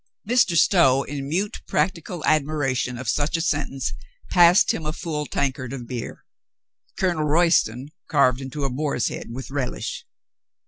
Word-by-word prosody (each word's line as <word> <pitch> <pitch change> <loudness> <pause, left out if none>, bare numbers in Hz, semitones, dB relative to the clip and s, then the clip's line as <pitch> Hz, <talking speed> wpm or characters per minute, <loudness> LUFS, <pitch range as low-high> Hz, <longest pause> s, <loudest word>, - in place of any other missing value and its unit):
Mr. 230 -8 +3
Stow, 135 -7 +4
in 140 -1 -6
mute 195 +6 -2
practical 175 -2 -1
admiration 140 -5 0
of 130 0 -7
such 145 +7 0
a - - -3
sentence, 145 -5 -1 0.4
passed 175 +1 +6
him 160 - -4
a 155 0 -3
full 150 -3 -4
tankard 130 -2 -2
of 125 -3 -6
beer. 120 -1 -7 0.7
Colonel 175 -5 0
Royston 150 -5 +2 0.2
carved 140 -4 +3
into 135 +2 -5
a 135 - 0
boar's 140 -2 -1
head - - -7
with 130 +3 -7
relish. 135 -3 -4
145 Hz, 145 wpm, -23 LUFS, 130-165 Hz, 0.7 s, passed